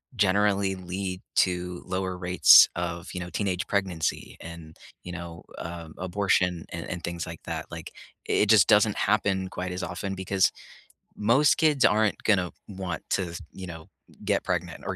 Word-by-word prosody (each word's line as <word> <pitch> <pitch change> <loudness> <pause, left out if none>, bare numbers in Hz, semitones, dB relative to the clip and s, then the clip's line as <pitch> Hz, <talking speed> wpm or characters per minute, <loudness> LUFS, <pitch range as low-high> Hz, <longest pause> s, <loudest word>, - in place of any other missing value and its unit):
generally 100 -1 +2
lead 95 +1 -5
to 90 -1 0
lower 95 0 -3
rates 90 0 +7
of, 85 +1 -4
you 90 - -4
know, 90 - -6
teenage 95 -1 -2
pregnancy 95 -6 -2
and, 85 -2 -10 0.3
you 90 - -7
know, 85 -1 -8 0.2
uh, 85 -1 -7
abortion 90 -2 0
and 85 -1 -5
and 90 -1 -5
things 85 -1 -4
like 85 0 -9
that. - - -5
Like, - - -8 0.3
it - - +2
it 105 - -1
just 105 -5 +6
doesn't 105 -1 +4
happen 100 -2 +1
quite 90 0 -5
as 90 +1 -4
often 100 -1 -4
because 95 0 +1 0.6
most 120 +8 +4
kids 150 -4 +3
aren't 105 0 +2
gonna 95 -5 +2 0.2
want 95 -4 -5
to, 85 -3 -1
you 95 -1 -8
know, 80 -2 -9 0.4
get - - +1
pregnant - - -3
or - - -3
95 Hz, 165 wpm, -26 LUFS, 85-100 Hz, 0.6 s, rates